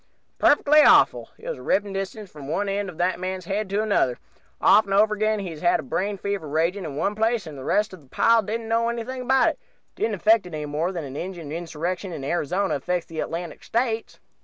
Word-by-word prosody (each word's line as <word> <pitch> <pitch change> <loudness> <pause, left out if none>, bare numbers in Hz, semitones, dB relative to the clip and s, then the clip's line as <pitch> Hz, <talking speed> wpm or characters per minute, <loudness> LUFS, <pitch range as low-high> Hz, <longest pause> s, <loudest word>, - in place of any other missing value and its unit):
Perfectly 295 +1 +5
awful. - - +5
It - - -12
was - - -4
a - - -10
ripping 200 -1 0
distance 195 +1 -5
from 145 -3 -10
one 185 +7 -1
end 200 0 -2
of 170 - -11
that 180 +1 0
man's 185 -1 -4
head 200 +2 -2
to 205 +2 0
t'other. 130 - +1 0.4
Often 200 -1 +5
and 200 - +5
over 215 0 +4
again 215 +1 +1
he's 175 -6 -6
had 350 -5 +2
brain 200 +2 -1
fever 200 -4 -3
a - - -8
raging 170 +5 0
in 145 -3 -6
one 200 +7 0
place, 220 -1 0
and 155 -2 -8
the 135 - -8
rest 210 +7 +1
of 185 - -11
the 140 - -22
pile 230 - +4
didn't 225 +2 -4
know 230 +1 +1
anything 240 +2 -4
about 265 +1 +3
it - - -6 0.4
didn't 220 -2 -1
affect 215 +1 +3
it 170 - -7
any 150 -1 -4
more 155 +5 -1
than 170 -4 -4
an 135 -1 -8
Injun 170 -2 -6
Insurrection 175 +3 -4
in 150 -4 -6
Arizona 175 +6 0
affects 175 +5 -2
the 160 -1 -7
Atlantic 170 +1 -5
States. 230 -1 -2
195 Hz, 230 wpm, -24 LUFS, 165-220 Hz, 0.4 s, Perfectly